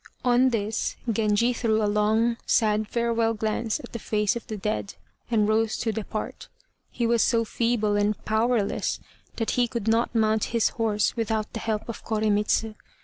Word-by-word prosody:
On 250 +1 +4
this 220 -2 -2
Genji 225 +2 +2
threw 220 -2 +1
a - - +3
long 215 +3 +2
sad 215 -1 +2
farewell 230 -1 0
glance 220 +1 -1
at - - -11
the 235 - -4
face 210 0 0
of 235 - -6
the 215 - -5
dead, 210 0 -3 0.3
and 215 -3 +2
rose 220 0 +1
to 225 - -1
depart. 215 0 -5 0.4
He 240 - -2
was 230 -1 +3
so 230 -2 +2
feeble 225 -2 0
and 205 0 +1
powerless 220 -1 0 0.4
that 225 - -1
he 245 -1 +2
could 230 -2 -4
not 230 +2 +1
mount 220 -1 +2
his 230 - +3
horse 215 -2 0
without 220 -2 -2
the 225 - -4
help 220 -1 -2
of 230 - -7
Koremitz. 215 0 +1
220 Hz, 170 wpm, -25 LUFS, 210-230 Hz, 0.4 s, On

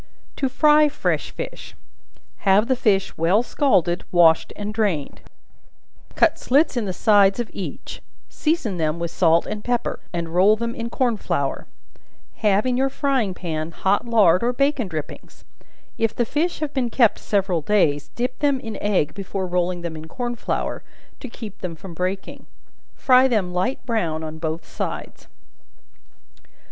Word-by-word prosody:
To 270 - 0
Fry 300 +2 +5
Fresh - - -1
Fish. - - -8 0.6
Have 205 +3 +3
the 260 - +2
fish 200 -6 +1
well 180 +8 +3
scalded, 180 - +1
washed 165 -2 +4
and 210 +1 -5
drained; 200 -10 -1 0.9
cut - - +3
slits 285 +3 +2
in 235 -3 -1
the 190 - -2
sides 200 +1 +4
of 240 - -3
each; 175 -8 -7 0.3
season 300 - -1
them 155 -1 0
with 170 0 -4
salt 170 -2 +3
and 210 -1 -5
pepper, 245 -1 -1
and 170 -2 -3
roll 195 +4 +5
them 235 +1 -3
in 230 0 -5
corn 240 -2 0
flour; 140 -8 -2 0.7
have 210 0 +2
in 250 -1 +1
your 270 +1 +2
frying 265 -8 0
pan 160 -3 -4
hot 195 +6 0
lard 200 -7 +4
or 240 +1 +1
bacon 275 -3 +1
drippings; 155 -4 -8 0.5
if 225 -1 0
the 240 - +1
fish 315 +7 -1
have 300 -1 -3
been 255 -3 0
kept 230 -2 +3
several 195 -5 0
days, 150 -6 +1
dip 250 +1 -3
them 285 -2 +2
in 225 -4 -6
egg 190 -8 +1
before 195 -1 -4
rolling 180 0 -1
them 170 -2 -5
in 155 0 -8
corn 240 +7 -4
flour, 235 - -3 0.4
to 260 - -7
keep 220 -4 -9
them 175 -2 -5
from 175 +2 -10
breaking; 185 +3 -4 0.5
fry 255 0 +5
them 205 -8 0
light 240 +11 -2
brown 170 -10 -1
on 160 0 -7
both 160 0 -4
sides. - - -6
205 Hz, 160 wpm, -22 LUFS, 175-245 Hz, 0.9 s, Fry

